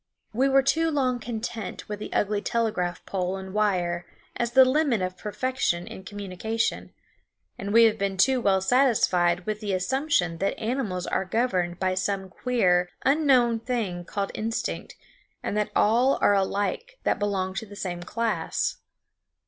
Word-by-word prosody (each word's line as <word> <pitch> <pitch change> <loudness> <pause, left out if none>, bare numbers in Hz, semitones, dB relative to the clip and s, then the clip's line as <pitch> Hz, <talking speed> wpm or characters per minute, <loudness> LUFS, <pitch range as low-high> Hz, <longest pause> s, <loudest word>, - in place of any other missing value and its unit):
We 260 +5 +2
were 270 0 +4
too 320 +5 +2
long 260 -5 0
content 225 -3 -5
with 210 0 -5
the - - -7
ugly 205 0 0
telegraph 210 -7 -1
pole 185 0 -2
and 190 0 -8
wire 180 -5 0 0.3
as 240 0 -2
the 260 +1 +8
limit 265 -3 +2
of 185 0 -3
perfection 210 -3 -1
in 190 - -9
communication; 205 +3 -3 0.7
and 200 +1 -4
we 230 +2 +7
have 220 -1 +3
been 195 -1 -1
too 255 +6 +3
well 190 -3 +3
satisfied 185 -7 +3
with 215 -1 -2
the 205 -3 -2
assumption 185 - 0
that 195 - -1
animals 220 -6 -2
are - - 0
governed 185 -4 0
by 185 -1 +1
some 190 0 -2
queer, 180 -5 +1 0.2
unknown 260 -5 +4
thing 220 -7 -3
called 200 +2 -3
instinct, 225 +1 -3 0.5
and - - -2
that 210 0 0
all 240 +6 +4
are - - +4
alike 205 - -1
that - - +1
belong 195 -2 -1
to 215 +3 -5
the 205 - -11
same 180 -3 -4
class. 230 +5 -1
210 Hz, 155 wpm, -26 LUFS, 185-245 Hz, 0.7 s, the